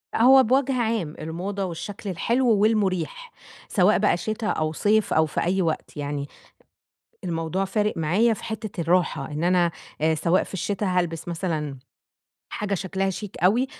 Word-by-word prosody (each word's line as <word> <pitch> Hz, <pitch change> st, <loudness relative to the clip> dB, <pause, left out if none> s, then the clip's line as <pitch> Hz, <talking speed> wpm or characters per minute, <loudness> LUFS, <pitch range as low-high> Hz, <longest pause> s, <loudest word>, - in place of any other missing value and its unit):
هو 260 Hz, +3 st, +7 dB
بوجه 265 Hz, +3 st, +2 dB
عام 220 Hz, -9 st, -1 dB
الموضة 185 Hz, +5 st, -4 dB
والشكل 190 Hz, +4 st, -6 dB
الحلو 235 Hz, +8 st, +1 dB
والمريح، 210 Hz, -, +1 dB, 0.4 s
سواء 200 Hz, +1 st, +3 dB
بقى 205 Hz, -4 st, +2 dB
شتا 215 Hz, +3 st, -3 dB
أو 155 Hz, -5 st, 0 dB
صيف 215 Hz, +5 st, +2 dB
أو 160 Hz, -, +4 dB
في 155 Hz, -, -2 dB
أي 190 Hz, +3 st, +1 dB
وقت، 160 Hz, -2 st, -2 dB
يعني 145 Hz, -1 st, -3 dB, 1.0 s
الموضوع 170 Hz, +2 st, -1 dB
فارق 210 Hz, +1 st, -1 dB
معايا 190 Hz, +9 st, +2 dB
في 215 Hz, -, -9 dB
حتّة 215 Hz, -5 st, -5 dB
الراحة 170 Hz, -2 st, +1 dB
إن 150 Hz, +2 st, -3 dB
أنا 175 Hz, -1 st, +3 dB, 0.3 s
آآ 160 Hz, +1 st, +3 dB
سواء 170 Hz, +4 st, +2 dB
في -, -, -13 dB
الشتا 200 Hz, +2 st, -2 dB
هالبس 175 Hz, -3 st, -1 dB
مثلًا 160 Hz, -5 st, -3 dB, 0.7 s
حاجة 205 Hz, -1 st, -2 dB
شكلها 190 Hz, +1 st, -1 dB
شيك 195 Hz, +1 st, -7 dB
أوي، 230 Hz, +8 st, +4 dB
190 Hz, 150 wpm, -24 LUFS, 165-215 Hz, 1.0 s, هو